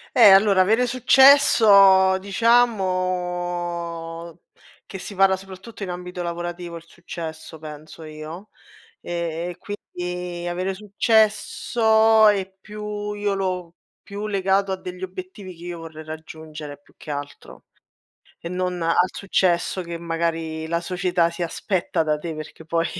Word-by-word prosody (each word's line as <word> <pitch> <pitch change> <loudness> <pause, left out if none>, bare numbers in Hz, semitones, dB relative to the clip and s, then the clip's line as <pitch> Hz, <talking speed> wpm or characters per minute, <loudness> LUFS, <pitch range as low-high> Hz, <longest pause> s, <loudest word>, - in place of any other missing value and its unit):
Eh, 220 -5 +9
allora, 195 -1 +6
avere 225 +6 +3
successo 220 -7 +6
diciamo, 180 -6 -1 0.5
che - - -7
si 190 +2 -8
parla 190 0 +3
soprattutto 195 +3 -10
in 185 - -5
ambito 180 0 -6
lavorativo 175 0 -5
il 165 - -12
successo 160 -2 -8
penso 155 +1 -10
io, 155 +6 -9 0.5
e 170 0 -4
quindi 180 -3 -6
avere 185 +2 -2
successo 220 +1 +3
è 195 -2 +1
più 210 0 -6
io 205 -1 -1
l'ho 180 -3 -3 0.3
più 200 +1 -7
legato 195 -1 +1
a 190 - -1
degli 180 0 -8
obiettivi 185 0 -8
che 170 +1 -12
io 175 -1 -5
vorrei 160 -1 -9
raggiungere 155 -2 -9
più - - -27
che 155 - -8
altro 145 0 -8 0.8
e 170 - -6
non 180 0 -2
al 165 0 +1 0.2
successo 185 -1 0
che 170 -1 -6
magari 165 -1 -3
la 170 +1 -1
società 175 -1 0
si 170 +1 -6
aspetta 175 +1 -1
da 155 -1 0
te 160 +2 -6
perché 155 +1 -9
poi 165 +1 0
180 Hz, 130 wpm, -23 LUFS, 170-195 Hz, 0.8 s, Eh